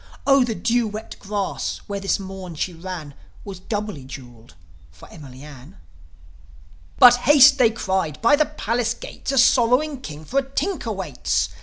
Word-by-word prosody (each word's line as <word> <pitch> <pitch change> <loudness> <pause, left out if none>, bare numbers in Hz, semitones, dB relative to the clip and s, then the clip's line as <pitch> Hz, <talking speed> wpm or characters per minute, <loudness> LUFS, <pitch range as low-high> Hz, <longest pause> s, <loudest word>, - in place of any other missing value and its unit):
Oh, 275 -1 +5
the 235 -3 -3
dew 230 +5 0
wet 215 +1 -8
grass, 200 -1 -4
where 200 -1 -5
this 195 0 -1
morn 190 -3 -8
she 180 +4 -3
ran, 165 -4 -8 0.3
Was 195 -3 -8
doubly 205 - -5
jewelled 120 - -12 0.3
for 75 0 -16
Emily 135 -4 -12
Ann." 140 -7 -13 1.2
"But 245 0 +8
haste!" 280 +1 +6
they 240 -3 +5
cried. 190 -8 -2
"By 235 +5 +4
the 305 +1 +1
palace 240 -5 -2
gates - - -7
A 270 - -1
sorrowing 250 +3 +3
king 155 - -9
for 270 - 0
a 270 -1 -6
tinker 380 +8 -3
waits. - - -2
205 Hz, 160 wpm, -22 LUFS, 160-245 Hz, 1.2 s, But